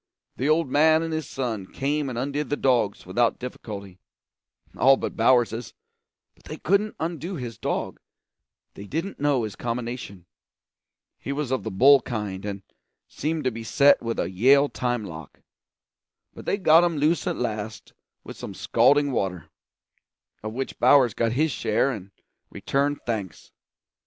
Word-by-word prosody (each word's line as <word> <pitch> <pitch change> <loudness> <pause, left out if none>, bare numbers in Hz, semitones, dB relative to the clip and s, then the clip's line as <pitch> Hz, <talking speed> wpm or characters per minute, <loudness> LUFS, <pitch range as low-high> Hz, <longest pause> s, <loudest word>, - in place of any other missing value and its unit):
The 135 +4 0
old 160 0 +3
man 155 +4 +4
and 165 -1 -3
his 155 -3 -3
son 115 -8 -3
came 145 +1 -1
and 120 - -5
undid 140 +4 -2
the 145 - -1
dogs 120 -6 +1
without 115 +6 +1
difficulty, 100 -6 -8 0.8
all 135 +1 +5
but - - -4
Bowers's; 120 -1 +2 0.6
but - - -27
they - - -7
couldn't 200 +4 +1
undo 170 +3 -4
his 120 - -7
dog, - - -3 0.7
they 100 - -10
didn't 165 - -4
know 140 -4 +1
his 105 -3 -5
combination; 120 -6 -5 0.9
he - - -5
was 140 -2 -3
of 130 - 0
the 110 - -4
bull 135 +7 +6
kind, 105 -6 -5
and 100 -1 -5 0.4
seemed 155 +1 -3
to 130 - +1
be 115 0 -7
set 140 +6 +4
with 115 0 -3
a - - 0
Yale 135 +9 +4
time 120 -3 -2
lock; 80 -5 -10 0.9
but - - -11
they 200 - 0
got 165 -3 +6
him 170 -3 0
loose 155 +5 +1
at 175 - 0
last 110 -2 -5 0.3
with - - -9
some - - -8
scalding 145 0 +3
water, 90 - -3 0.9
of 110 - -5
which 130 +4 -5
Bowers 125 -2 +5
got 115 +1 0
his 155 +4 +1
share 110 +3 +1
and 100 -6 -7 0.4
returned 140 +1 -1
thanks. 105 -6 -5
125 Hz, 155 wpm, -25 LUFS, 110-145 Hz, 0.9 s, bull